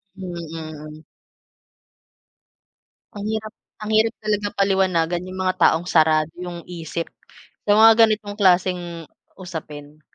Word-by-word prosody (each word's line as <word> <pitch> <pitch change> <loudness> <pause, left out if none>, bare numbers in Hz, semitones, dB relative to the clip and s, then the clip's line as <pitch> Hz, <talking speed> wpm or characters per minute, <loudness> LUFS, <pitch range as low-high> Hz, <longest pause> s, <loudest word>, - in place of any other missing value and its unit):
Hmm, 185 -2 -7 0.2
mm. 155 -1 -9 2.1
Ang 205 0 -6
hirap 215 0 -3 0.3
ang 215 - -5
hirap 225 +1 +3
talaga 210 -1 -1
paliwanagan 185 -3 +1
'yung 185 0 -8
mga 185 0 0
taong 165 +2 +3
sarado 155 -1 +3
'yung 175 -1 -7
isip 165 -1 -5 0.6
sa 205 - +2
mga 225 +1 +7
ganitong 210 -2 -3
klaseng 180 -3 +1 0.3
usapin. 155 -4 -9
180 Hz, 110 wpm, -22 LUFS, 160-205 Hz, 2.1 s, mga